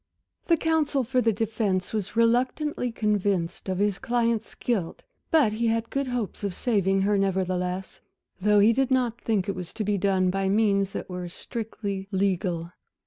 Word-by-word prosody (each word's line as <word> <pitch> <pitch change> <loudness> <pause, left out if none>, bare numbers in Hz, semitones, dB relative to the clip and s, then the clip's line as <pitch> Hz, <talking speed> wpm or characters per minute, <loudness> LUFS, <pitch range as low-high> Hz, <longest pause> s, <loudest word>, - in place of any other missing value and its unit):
The 335 - +3
counsel 310 -4 +1
for 255 +2 +1
the 230 - +3
defence 205 -3 -1
was 210 -1 -3
reluctantly 245 +3 +1
convinced 200 -5 -1
of 185 - -1
his 200 0 +1
client's 235 -3 0
guilt, 200 -9 -2 0.3
but 290 -10 +4
he 230 +2 0
had 225 0 0
good 275 -1 -1
hopes 245 -5 -3
of 200 -3 -2
saving 195 -5 +1
her 200 +1 +2
nevertheless, 185 -1 -1 0.4
though 210 +1 +4
he 220 +3 +6
did 265 +2 +1
not 250 -3 +1
think 210 -5 0
it 200 - 0
was 180 -2 -6
to 220 - -3
be 205 -1 0
done 185 -1 +2
by 195 0 0
means 200 -2 +2
that - - -4
were 180 -1 -5
strictly 200 -1 -5
legal. 185 -3 0
210 Hz, 170 wpm, -26 LUFS, 190-235 Hz, 0.4 s, he